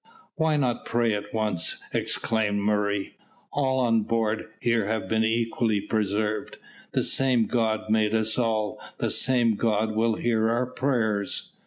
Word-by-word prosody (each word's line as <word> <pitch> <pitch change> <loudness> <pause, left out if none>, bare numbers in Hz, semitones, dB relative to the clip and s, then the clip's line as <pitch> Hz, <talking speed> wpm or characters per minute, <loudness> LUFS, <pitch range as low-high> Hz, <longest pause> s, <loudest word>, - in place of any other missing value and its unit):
"Why 160 -2 +1
not 125 -4 0
pray 115 -1 +1
at 105 0 -4
once?" 105 -6 -1
exclaimed 110 -2 0
Murray. 105 -1 -1 0.4
"All 130 -2 +1
on 115 -3 +3
board 110 0 -1
here 115 -4 +1
have 110 -3 -2
been 110 +2 +1
equally 115 -1 +1
preserved. 105 0 -2 0.4
The - - +1
same 130 -4 +3
God 110 -2 0
made 110 0 +2
us 110 0 +1
all, 110 -4 -1 0.2
the - - -1
same 120 -3 +3
God 110 0 0
will 115 0 +2
hear 110 -1 +1
our 120 +2 +1
prayers." 115 -6 -1
110 Hz, 145 wpm, -26 LUFS, 105-120 Hz, 0.4 s, on